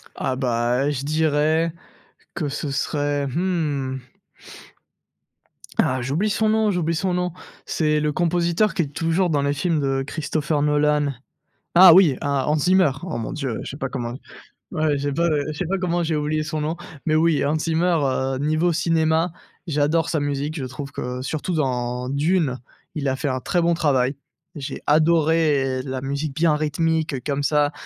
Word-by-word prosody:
Ah 130 Hz, -1 st, -2 dB
bah 125 Hz, +1 st, 0 dB
et -, -, +1 dB
je 140 Hz, 0 st, -4 dB
dirais 155 Hz, +1 st, +1 dB, 0.6 s
que 155 Hz, -6 st, -2 dB
ce 145 Hz, 0 st, -4 dB
serait, 145 Hz, 0 st, -1 dB
mmh 145 Hz, -5 st, -1 dB, 1.8 s
ah, 130 Hz, 0 st, +2 dB
j'oublie 150 Hz, -, 0 dB
son 215 Hz, +1 st, +1 dB
nom, 220 Hz, -1 st, +2 dB
j'oublie 165 Hz, -2 st, 0 dB
son 185 Hz, +2 st, -1 dB
nom. 180 Hz, -1 st, -1 dB, 0.3 s
C'est 150 Hz, -1 st, +1 dB
le 150 Hz, 0 st, 0 dB
compositeur 175 Hz, +3 st, +1 dB
qui 170 Hz, -, +1 dB
est 145 Hz, -, -5 dB
toujours 165 Hz, +4 st, +1 dB
dans 145 Hz, -3 st, +1 dB
les 140 Hz, 0 st, +1 dB
films 160 Hz, +2 st, 0 dB
de 135 Hz, -1 st, 0 dB
Christopher 155 Hz, 0 st, -2 dB
Nolan. 150 Hz, -1 st, +2 dB, 0.6 s
Ah 180 Hz, 0 st, +10 dB
oui, 165 Hz, -7 st, +6 dB
ah 140 Hz, -2 st, 0 dB
Hans 150 Hz, -, +3 dB
Zimmer, 180 Hz, -1 st, +4 dB
oh 185 Hz, -, -4 dB
mon 115 Hz, -, -4 dB
Dieu, 135 Hz, -6 st, -3 dB
je -, -, -6 dB
sais 140 Hz, -, -8 dB
pas 135 Hz, -, -2 dB
comment 120 Hz, -2 st, -4 dB, 0.6 s
ouais, 155 Hz, -2 st, +1 dB
j'ai 145 Hz, +1 st, -2 dB
pas 170 Hz, +4 st, +1 dB, 0.2 s
je 155 Hz, -, -3 dB
sais 180 Hz, -, -2 dB
pas 195 Hz, +2 st, -1 dB
comment 175 Hz, -1 st, 0 dB
j'ai 160 Hz, -1 st, 0 dB
oublié 150 Hz, +1 st, -1 dB
son 155 Hz, 0 st, -3 dB
nom. 155 Hz, +3 st, -2 dB, 0.3 s
Mais 155 Hz, -, +2 dB
oui, 160 Hz, -3 st, +3 dB
Hans 150 Hz, +2 st, +1 dB
Zimmer, 165 Hz, +2 st, +1 dB
heu, 130 Hz, 0 st, -1 dB
niveau 155 Hz, +4 st, +1 dB
cinéma, 165 Hz, 0 st, +1 dB, 0.4 s
j'adore 155 Hz, +2 st, +1 dB
sa 160 Hz, -, 0 dB
musique, 145 Hz, +2 st, -2 dB
je 135 Hz, -, -3 dB
trouve 140 Hz, +2 st, -7 dB
que 125 Hz, -1 st, -4 dB
surtout 155 Hz, +5 st, -3 dB
dans 125 Hz, -4 st, -1 dB
Dune, 145 Hz, -1 st, +1 dB, 0.4 s
il 140 Hz, -2 st, -1 dB
a 130 Hz, -, +1 dB
fait 145 Hz, -, -2 dB
un 130 Hz, 0 st, -1 dB
très 175 Hz, +6 st, 0 dB
bon 170 Hz, 0 st, +3 dB
travail. 135 Hz, -5 st, +1 dB, 0.4 s
J'ai 145 Hz, -1 st, -6 dB
adoré 155 Hz, -4 st, +3 dB
la 130 Hz, -1 st, -4 dB
musique 140 Hz, +2 st, -3 dB
bien 160 Hz, 0 st, +2 dB
rythmique 155 Hz, -2 st, -1 dB
comme 145 Hz, -1 st, -1 dB
ça 145 Hz, 0 st, +2 dB
150 Hz, 175 wpm, -22 LUFS, 140-165 Hz, 1.8 s, Ah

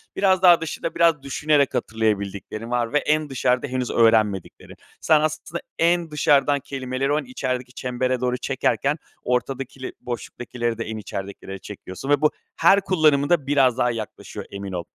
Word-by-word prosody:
Biraz 190 Hz, -2 st, +3 dB
daha 175 Hz, -3 st, +7 dB
dışında, 165 Hz, -, -4 dB
biraz 165 Hz, -4 st, +3 dB
düşünerek 140 Hz, 0 st, +1 dB
hatırlayabildiklerin 110 Hz, 0 st, -2 dB
var 120 Hz, 0 st, 0 dB
ve -, -, +4 dB
en 155 Hz, 0 st, 0 dB
dışarıda 125 Hz, 0 st, 0 dB
henüz 130 Hz, -1 st, -2 dB
öğrenmediklerin. 110 Hz, -5 st, +1 dB, 0.3 s
Sen 155 Hz, -1 st, +4 dB
aslında 155 Hz, +2 st, -3 dB, 0.2 s
en 170 Hz, -1 st, +2 dB
dışarıdan 145 Hz, -1 st, +3 dB
kelimeleri 130 Hz, 0 st, -3 dB
o, 150 Hz, -, +2 dB
en -, -, -5 dB
içerideki 125 Hz, 0 st, -4 dB
çembere 125 Hz, 0 st, -2 dB
doğru 125 Hz, 0 st, 0 dB
çekerken, 140 Hz, +3 st, 0 dB, 0.3 s
ortadakile 130 Hz, +1 st, -2 dB
boşluktakileri 120 Hz, 0 st, -4 dB
de 115 Hz, -, -4 dB
en 110 Hz, 0 st, -5 dB
içeridekilere 95 Hz, -1 st, -7 dB
çekiyorsun 100 Hz, +5 st, -8 dB
ve 145 Hz, -1 st, +3 dB
bu 150 Hz, -, +4 dB, 0.2 s
her 195 Hz, +4 st, +5 dB
kullanımında 155 Hz, -4 st, +2 dB
biraz 135 Hz, -4 st, +3 dB
daha 125 Hz, -1 st, +2 dB
yaklaşıyor, 110 Hz, -2 st, -7 dB
emin 100 Hz, -1 st, -6 dB
ol. 90 Hz, -2 st, -3 dB
130 Hz, 150 wpm, -23 LUFS, 115-150 Hz, 0.3 s, daha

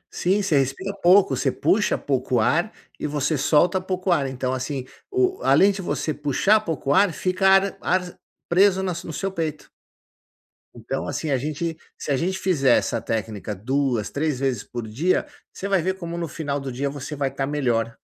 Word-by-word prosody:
Sim, 195 Hz, +3 st, +1 dB
você 155 Hz, -8 st, +3 dB
respira 135 Hz, +9 st, -2 dB
pouco. 190 Hz, +3 st, +5 dB
Você -, -, 0 dB
puxa 210 Hz, +1 st, +1 dB
pouco 130 Hz, -3 st, 0 dB
ar 170 Hz, -, +2 dB, 0.3 s
e -, -, -2 dB
você 150 Hz, +1 st, 0 dB
solta 160 Hz, +7 st, +3 dB
pouco 185 Hz, 0 st, -2 dB
ar. 140 Hz, -5 st, +2 dB
Então, 130 Hz, -1 st, -2 dB
assim, 130 Hz, 0 st, -3 dB, 0.2 s
o 380 Hz, -1 st, +1 dB
além 185 Hz, +9 st, +5 dB
de 195 Hz, 0 st, -5 dB
você 160 Hz, -3 st, -2 dB
puxar 150 Hz, +10 st, +2 dB
pouco 155 Hz, -8 st, -2 dB
ar, 195 Hz, -1 st, +4 dB
fica 185 Hz, +3 st, 0 dB
ar 195 Hz, 0 st, +4 dB
ar 180 Hz, -1 st, -1 dB, 0.3 s
preso 190 Hz, +1 st, +4 dB
na 185 Hz, -, -1 dB
su 170 Hz, -, -7 dB
no 160 Hz, -, -5 dB
seu 195 Hz, +5 st, -2 dB
peito. 160 Hz, -4 st, -4 dB, 1.1 s
Então, 120 Hz, +3 st, -4 dB
assim, 160 Hz, -, -3 dB
a 135 Hz, -, +2 dB
gente 155 Hz, +4 st, -3 dB, 0.2 s
se 145 Hz, -, -4 dB
a 135 Hz, -, +2 dB
gente 190 Hz, +6 st, -1 dB
fizer 140 Hz, -10 st, +3 dB
essa 115 Hz, -, -1 dB
técnica 110 Hz, -2 st, -3 dB
2, 125 Hz, +1 st, -1 dB
3 145 Hz, -2 st, -1 dB
vezes 130 Hz, -5 st, -1 dB
por 120 Hz, -3 st, -6 dB
dia, 155 Hz, +13 st, 0 dB, 0.3 s
você 195 Hz, -, -5 dB
vai 195 Hz, -3 st, +2 dB
ver 190 Hz, +1 st, 0 dB
como 170 Hz, -1 st, -5 dB
no 170 Hz, -1 st, -2 dB
final 145 Hz, -2 st, -3 dB
do 135 Hz, -1 st, -5 dB
dia 140 Hz, +3 st, -2 dB
você 145 Hz, +1 st, -6 dB
vai 140 Hz, -2 st, -1 dB
estar 135 Hz, 0 st, -3 dB
melhor. 120 Hz, -6 st, 0 dB
150 Hz, 190 wpm, -23 LUFS, 135-185 Hz, 1.1 s, pouco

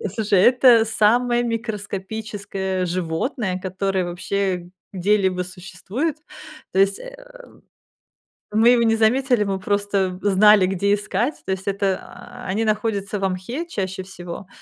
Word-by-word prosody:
Слушай, 210 Hz, -3 st, +2 dB
это 245 Hz, 0 st, +6 dB
самое 240 Hz, +3 st, +2 dB
микроскопическое 205 Hz, -4 st, -4 dB
животное, 185 Hz, -, -2 dB
которое 190 Hz, 0 st, -1 dB
вообще 180 Hz, 0 st, -2 dB, 0.2 s
где-либо 190 Hz, -1 st, +1 dB
существует. 195 Hz, -, -4 dB, 0.6 s
То 190 Hz, -, +1 dB
есть, 195 Hz, 0 st, +3 dB
э, -, -, -9 dB, 1.4 s
мы 220 Hz, +3 st, +4 dB
его 240 Hz, -1 st, +5 dB
не 225 Hz, 0 st, +3 dB
заметили, 245 Hz, +1 st, +2 dB
мы 195 Hz, -1 st, -2 dB
просто 200 Hz, -2 st, -1 dB
знали, 205 Hz, -1 st, +5 dB
где 195 Hz, +2 st, +1 dB
искать, 215 Hz, +7 st, -1 dB
то -, -, -3 dB
есть, 190 Hz, +1 st, -4 dB
а, 195 Hz, -1 st, -4 dB
они 210 Hz, +4 st, -1 dB
находятся 210 Hz, -2 st, -1 dB
во 195 Hz, -, 0 dB
мхе 210 Hz, -, -4 dB
чаще 190 Hz, -, -4 dB
всего 180 Hz, -1 st, -9 dB
200 Hz, 125 wpm, -22 LUFS, 190-225 Hz, 1.4 s, это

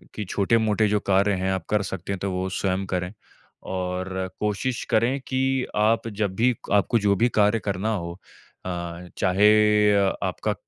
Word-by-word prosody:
कि 105 Hz, -, -4 dB
छोटे-मोटे 110 Hz, +1 st, +2 dB
जो 105 Hz, 0 st, +1 dB
कार्य 100 Hz, +2 st, +3 dB
हैं 95 Hz, 0 st, 0 dB
आप 95 Hz, -3 st, -3 dB
कर 105 Hz, -1 st, +2 dB
सकते 95 Hz, 0 st, -5 dB
हैं, 95 Hz, -, -5 dB
तो 100 Hz, 0 st, -2 dB
वो 95 Hz, 0 st, -2 dB
स्वयं 95 Hz, 0 st, -1 dB
करें। 90 Hz, -1 st, -3 dB, 0.5 s
और 95 Hz, 0 st, -3 dB
कोशिश 105 Hz, +4 st, -2 dB
करें 120 Hz, +5 st, +2 dB
कि 130 Hz, 0 st, 0 dB
आप 110 Hz, +2 st, +2 dB
जब 100 Hz, -3 st, 0 dB
भी 120 Hz, +4 st, +2 dB, 0.2 s
आपको 105 Hz, +3 st, +3 dB
जो 100 Hz, -1 st, +2 dB
भी 120 Hz, +5 st, +2 dB
कार्य 105 Hz, +2 st, +4 dB
करना 105 Hz, +2 st, -2 dB
हो 85 Hz, -1 st, -6 dB, 0.5 s
अ, -, -, -3 dB, 0.5 s
चाहे 95 Hz, +3 st, +4 dB, 0.5 s
अ, 100 Hz, -1 st, +2 dB
आपका -, -, -1 dB
100 Hz, 170 wpm, -24 LUFS, 95-110 Hz, 0.5 s, कार्य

